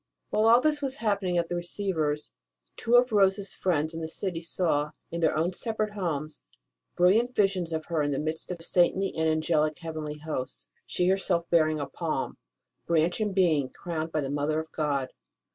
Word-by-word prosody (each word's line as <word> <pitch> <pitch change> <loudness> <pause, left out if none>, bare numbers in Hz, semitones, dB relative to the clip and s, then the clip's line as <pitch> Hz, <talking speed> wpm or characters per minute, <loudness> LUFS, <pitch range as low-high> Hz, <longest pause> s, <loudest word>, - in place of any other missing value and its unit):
While 215 +1 +3
all 235 +2 +7
this 300 0 +2
was 270 -1 -2
happening 200 -7 0
at 170 -1 +1
the 175 - -3
Receiver 175 -3 -1
s, 150 0 -9 0.4
two 235 - +1
of 245 0 +5
Rose 195 -2 +4
s 200 -1 -6
friends 160 -3 0
in 165 - -5
the 160 - -3
city 170 0 -3
saw, 155 -3 0 0.2
in 170 - -3
their 160 - +2
own 170 +4 +1
separate 215 +1 -2
homes, 155 -6 -3 0.5
brilliant 225 +8 +3
visions 190 -4 +1
of 160 -1 -3
her 165 -3 -1
in 145 - 0
the 140 - -1
midst 155 +2 -3
of 170 -2 -5
saintly 185 +2 +2
and 160 0 +1
angelic 155 -1 +1
heavenly 155 -3 -5
hosts, 140 - -5 0.2
she 180 - 0
herself 185 -3 +1
bearing 155 -2 +3
a 145 - -2
palm 155 -1 -3 0.5
branch 170 +4 +2
and 210 -3 -1
being 155 -8 +3
crowned 165 -2 -5
by 155 - 0
the 135 -1 -3
Mother 145 +2 0
of 160 0 -7
God. 140 -4 -1
170 Hz, 195 wpm, -28 LUFS, 155-195 Hz, 0.5 s, all